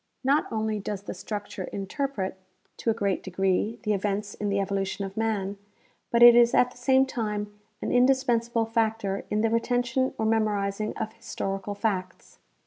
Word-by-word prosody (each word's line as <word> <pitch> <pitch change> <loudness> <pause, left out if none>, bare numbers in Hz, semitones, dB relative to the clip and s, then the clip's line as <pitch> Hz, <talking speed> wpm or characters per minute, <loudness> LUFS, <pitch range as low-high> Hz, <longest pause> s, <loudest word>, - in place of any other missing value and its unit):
Not 280 +3 +2
only 220 -1 -1
does 200 0 -5
the - - -5
struc 205 +3 -5
ture 185 - -5
interpret, 200 0 -3 0.4
to - - -1
a - - +4
great 200 -4 0
degree, 190 +4 0
the 210 -2 +1
events 205 +1 -2
in 205 - -3
the 200 0 +1
evolution 195 0 -2
of 195 - -7
naan, 205 -2 -1 0.5
but 235 0 +4
it 240 0 +10
is 240 0 +5
at 250 0 +4
the - - -17
same 265 0 +4
time 210 -5 -3 0.3
an - - -1
indispensable 245 -3 +2
factor 220 -3 -1
in 210 0 +1
the 225 0 +2
retention 245 +2 0
or 220 - -1
memorizing 215 -2 0
of 220 - -4
historical 195 -3 -4
facts. 190 -4 -3
215 Hz, 170 wpm, -27 LUFS, 200-235 Hz, 0.5 s, it